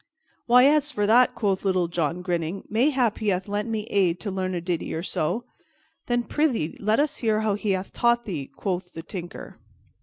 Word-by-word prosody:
"Why, 250 +2 +7
as 295 +1 +4
for 205 -6 0
that," 240 +4 +5
quoth 195 -4 0
Little 185 -3 +1
John, 170 +1 -2
grinning, 175 +1 -2
"mayhap 245 0 +1
he 215 - -3
hath 185 -1 0
lent 205 +2 -2
me 220 -2 -2
aid 185 -3 +2
to 205 - -3
learn 185 -1 -2
a - - -1
ditty 170 -2 -3
or 165 - -3
so." 180 +6 -1 0.6
"Then, 240 -1 +1
prythee, 245 - 0
let 215 +3 +2
us 295 0 +1
hear 220 -2 +1
how 215 -1 +1
he 205 0 0
hath 185 +1 -4
taught 235 0 +2
thee," 155 -9 -4
quoth 180 +4 -4
the 165 - -7
Tinker. 175 -1 -8
200 Hz, 200 wpm, -25 LUFS, 180-235 Hz, 0.6 s, Why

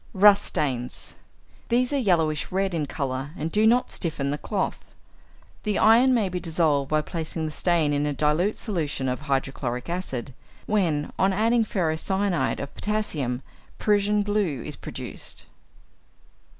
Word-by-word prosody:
=Rust 205 +1 +6
Stains.= 125 -4 -2 0.6
These 250 +3 +2
are - - +2
yellowish 165 - +1
red 190 0 0
in 155 -3 -1
colour, 135 -1 -3
and 160 +2 -3
do 215 +1 +4
not 245 +2 +3
stiffen 145 -5 -2
the 145 - -1
cloth. 200 -3 -2 0.8
The 210 -2 0
iron 235 +4 +6
may 230 -6 +3
be 180 0 -3
dissolved 155 -5 +1
by 155 0 +2
placing 160 0 -4
the 155 - -3
stain 160 -2 +1
in 145 +1 +1
a - - 0
dilute 150 +8 +1
solution 155 - -2
of 125 0 -2
hydrochloric 135 -1 -2
acid, 135 -8 -4 0.3
when, 170 -9 0
on 190 +1 +3
adding 225 +4 +3
ferrocyanide 180 -3 0
of 140 - -6
potassium, 150 - -2 0.3
Prussian 210 0 +2
blue 200 - 0
is - - -6
produced. - - -7
170 Hz, 145 wpm, -25 LUFS, 145-205 Hz, 0.8 s, =Rust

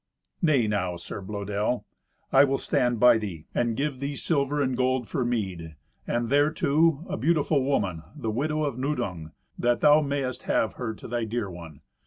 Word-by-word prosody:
"Nay 150 - +3
now, 95 -4 -1
Sir 85 +3 -7
Blœdel, 105 +3 -2 0.5
I - - +7
will 135 -1 +2
stand 120 -3 0
by 120 -1 +6
thee, 90 -8 -6
and 120 -2 0
give 140 -2 -2
thee 140 +1 -3
silver 145 -1 0
and 130 -3 +1
gold 130 -1 0
for 125 - -1
meed, 95 -10 -3 0.3
and, 120 -1 -1
thereto, 150 +2 +3
a - - -3
beautiful 150 +1 +2
woman, 100 - 0
the 110 - -3
widow 155 +6 -1
of 140 -4 -2
Nudung, 110 - -3 0.3
that 120 0 +1
thou 150 +1 +6
mayest 140 -3 -2
have 110 - +2
her 110 -3 -4
to - - -10
thy 120 -1 -2
dear 110 -3 -3
one. 80 -4 -10
120 Hz, 175 wpm, -26 LUFS, 105-140 Hz, 0.5 s, I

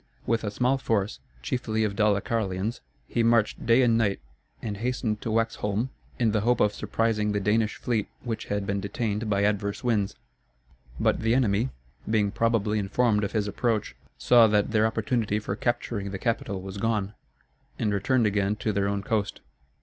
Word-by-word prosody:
With 115 -1 0
a 105 - -1
small 125 +5 +1
force, 105 -5 -1 0.2
chiefly 110 - -1
of 105 -2 -1
Dalecarlians, 105 0 0 0.3
he 120 - 0
marched 115 -2 +2
day 120 +3 +5
and 115 -2 +3
night, 100 -3 +1 0.4
and 105 -3 -4
hastened 115 -2 -2
to - - -3
Waxholm 115 +1 0 0.3
in 115 -3 +2
the 105 -1 +1
hope 120 +3 +2
of 105 - +3
surprising 105 -1 0
the 105 - +1
Danish 105 +2 +1
fleet 115 -4 -1 0.2
which 115 -3 -4
had 100 -1 -2
been 100 0 -1
detained 105 +2 -2
by 100 -1 +2
adverse 100 +1 0
winds. 105 -5 +1 0.8
But - - +2
the 115 +1 +2
enemy, 115 -1 +2 0.4
being 105 -2 +2
probably 110 -2 +1
informed 105 +2 +1
of 100 - -3
his 105 -2 0
approach, 110 +1 -1 0.2
saw 120 -2 +6
that 105 0 +2
their 110 0 +3
opportunity 110 -1 0
for 105 -2 -3
capturing 115 -3 -2
the 95 - -4
capital 100 -3 -2
was 95 +1 -7
gone, 105 -2 0 0.6
and 105 - 0
returned 115 +4 +2
again 105 0 +1
to 110 +1 -1
their 100 0 +1
own 100 0 -1
coast. 105 -2 -1
105 Hz, 170 wpm, -26 LUFS, 100-115 Hz, 0.8 s, saw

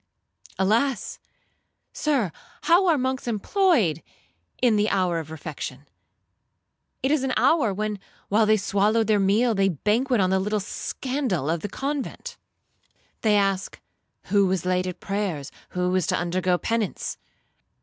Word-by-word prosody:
Alas! 220 +5 0 0.7
Sir, 270 - 0 0.3
how 345 +4 +4
are 330 -3 +4
monks 260 -1 -2
employed 230 - +2 0.6
in 240 -3 +3
the 210 +1 +2
hour 180 -4 +1
of 160 -2 -8
refection? 145 -3 -7 1.2
It 265 - +2
is 305 -3 +2
an 265 -1 0
hour, 255 -1 +3
when, 210 +1 -3 0.3
while 215 +2 +3
they 215 0 +5
swallow 205 +3 +2
their 215 -1 +2
meal, 215 +5 +3
they 195 -1 +2
banquet 220 - +1
on 185 -1 +2
the 190 - +3
little 210 +2 0
scandal 210 - -2
of 170 - 0
the 205 - -5
convent. 275 +5 -4 0.9
They 215 -2 +3
ask, 195 -2 0 0.4
'Who 200 -1 +3
was 185 -2 -1
late 185 0 +1
at 180 -1 -6
prayers? 195 -8 -3 0.2
Who 180 0 -1
is 185 -3 +1
to - - +1
undergo 180 +1 0
penance?' 225 +1 -2
205 Hz, 140 wpm, -24 LUFS, 185-245 Hz, 1.2 s, they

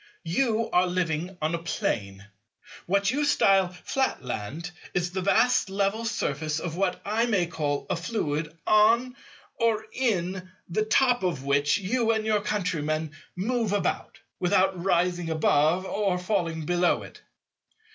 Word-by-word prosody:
You 225 +5 +1
are 180 +1 +4
living 175 0 -2
on 155 +2 0
a 170 - -1
Plane. 100 -11 -3 0.6
What 200 +3 +2
you 290 +3 0
style 195 -9 +4
Flatland 160 - -3 0.2
is 175 0 0
the 190 +1 -2
vast 200 +4 +3
level 200 +3 -1
surface 155 -8 -2
of 165 0 -4
what 190 0 0
I 225 +3 +1
may 200 -7 +2
call 150 -4 -2
a - - 0
fluid, 165 -5 -2
or 225 0 +1
in, 185 -7 -1 0.2
the 215 +5 0
top 245 +2 +3
of 170 -8 -1
which 145 +1 +2
you 225 +4 0
and 220 -1 -1
your 215 -1 +2
countrymen 160 -7 -1 0.2
move 220 +2 -1
about, 205 - -2 0.2
without 185 0 +2
rising 175 -2 +1
above 160 +3 +2
or 195 -2 0
falling 175 -4 -1
below 175 +1 +2
it. - - -13
185 Hz, 135 wpm, -26 LUFS, 165-215 Hz, 0.6 s, are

